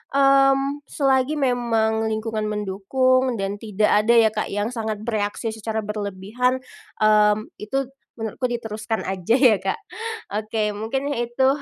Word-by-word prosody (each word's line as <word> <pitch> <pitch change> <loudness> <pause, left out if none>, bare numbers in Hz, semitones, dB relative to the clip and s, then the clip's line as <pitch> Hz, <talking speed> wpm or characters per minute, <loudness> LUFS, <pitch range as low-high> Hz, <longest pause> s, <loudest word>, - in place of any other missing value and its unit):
mmm, 275 +1 +4
selagi 270 +1 +1
memang 230 -5 +1
lingkungan 220 0 -2
mendukung 235 +6 +1
dan 200 0 -3
tidak 210 -1 0
ada 235 +2 +4
ya, 225 -1 +6
Kak, 215 -1 -2
yang 205 +4 -2
sangat 220 -3 -4
bereaksi 220 0 -2
secara 220 0 -4
berlebihan, 210 +5 -2 0.4
mmm, 210 0 +4
itu 270 +6 -1 0.3
menurutku 225 +3 -3
diteruskan 225 -2 -3
aja 190 +4 0
ya, 250 -6 +5
Kak. 450 - -2 0.6
Oke, 215 -1 -1
mungkin 230 +7 -3
ya 240 -4 -1
itu 260 +3 +1
220 Hz, 135 wpm, -23 LUFS, 210-255 Hz, 0.6 s, ya